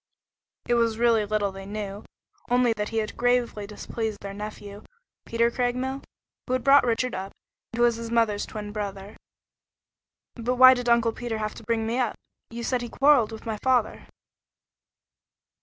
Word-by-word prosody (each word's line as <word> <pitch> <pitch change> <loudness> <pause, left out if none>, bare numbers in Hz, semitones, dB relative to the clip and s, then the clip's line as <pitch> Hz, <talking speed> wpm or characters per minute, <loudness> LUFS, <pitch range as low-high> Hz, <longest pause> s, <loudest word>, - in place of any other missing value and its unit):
It - - +2
was 230 -2 +2
really 230 -3 +3
little 205 -1 0
they 195 0 -9
knew, 205 0 -5 0.5
only 245 -1 +3
that 210 -1 -3
he 225 - -4
had 215 -1 -2
gravely 245 -4 0
displeased 215 +1 -4
their 200 0 -6
nephew, 205 0 -8 0.5
Peter 235 +1 +2
Craigmile, 255 +2 -2 0.5
who 255 - -1
had 255 -2 0
brought 275 -2 +6
Richard 245 +2 0
up, 190 +1 -5 0.4
and 230 - -7
who 240 - +3
was 235 -1 +3
his 230 0 -6
mother's 225 -3 +1
twin 210 -1 -6
brother. 200 -1 -6 1.2
"But 245 +1 -2
why 255 +1 +9
did 245 -1 -2
Uncle 235 -1 +4
Peter 235 -1 -4
have 215 -1 -3
to - - -12
bring 225 -1 0
me 230 +3 -1
up? 240 -4 0 0.3
You 235 +1 -6
say 250 +1 0
he 240 -1 -6
quarreled 270 -5 +4
with 220 - -9
my 220 -2 -3
father?" 255 -4 +1
230 Hz, 175 wpm, -26 LUFS, 210-245 Hz, 1.2 s, why